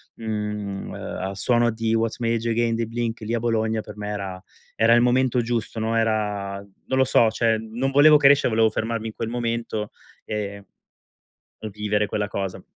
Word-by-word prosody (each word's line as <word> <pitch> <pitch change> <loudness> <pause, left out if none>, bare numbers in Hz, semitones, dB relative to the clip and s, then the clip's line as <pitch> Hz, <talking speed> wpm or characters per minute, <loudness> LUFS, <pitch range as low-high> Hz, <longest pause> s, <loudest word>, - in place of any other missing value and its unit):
mhmm, 105 -3 -4
uhm, - - -8
al 95 +1 -5
suono 120 +1 +2
di 115 0 -1
What's 115 +1 0
My 115 -1 0
Age 115 0 -1
dei 115 -1 0
Blink 115 0 -3
lì 110 +2 -3
a 120 - +1
Bologna 110 -1 0
per 105 0 -11
me 105 0 -5
era 95 -3 -5 0.4
era 115 +1 +5
il 120 - +5
momento 125 0 +2
giusto, 115 -1 -3
no, 110 +1 0
era, 105 -3 0 0.3
non 130 - 0
lo 130 - +5
so, 115 -3 +4
cioè 115 -1 +2
non 115 +5 -3
volevo 150 +2 +7
crescere, 140 -2 +5
volevo 110 0 +4
fermarmi 115 +1 -3
in 110 - -6
quel 115 - -4
momento 115 -3 -3 0.3
e 100 -1 -4 1.1
vivere 105 0 0
quella 105 0 -2
cosa. 95 -2 -4
115 Hz, 180 wpm, -23 LUFS, 105-120 Hz, 1.1 s, volevo